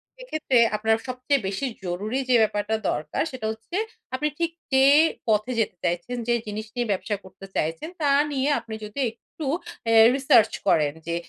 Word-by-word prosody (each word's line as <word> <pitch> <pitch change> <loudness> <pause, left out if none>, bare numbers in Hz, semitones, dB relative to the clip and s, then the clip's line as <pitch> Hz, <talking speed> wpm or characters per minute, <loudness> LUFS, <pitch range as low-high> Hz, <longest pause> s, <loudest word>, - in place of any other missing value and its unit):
সেক্ষেত্রে 310 - -1 0.2
আপনার 220 +1 +2
সবচেয়ে 255 +3 0
বেশি 195 +7 -2 0.2
জরুরি 200 +8 -2
যে 250 - +5
ব্যাপারটা 215 0 +1 0.2
দরকার 150 0 -3
সেটা 255 -4 -6
হচ্ছে 220 +9 -9 0.4
আপনি 300 +3 0
ঠিক 335 -1 0 0.2
যে 265 0 +6 0.5
পথে 215 +3 +2
যেতে 220 - 0
চাইছেন, 175 +8 -1
যেই 240 -1 +2
জিনিস 210 +1 -4
নিয়ে 240 -2 -1
ব্যবসা 200 +2 -1
করতে 190 +1 -12
চাইছেন, 165 - -2
তা 290 - +2 0.2
নিয়ে 275 +1 0
আপনি 220 - -8
যদি 210 +6 -7
একটু 265 +6 -10 0.4
অ্যা 225 0 +4 0.2
research 250 -5 +4
করেন 150 -2 +3
যে 170 - -1
225 Hz, 165 wpm, -25 LUFS, 205-260 Hz, 0.5 s, যে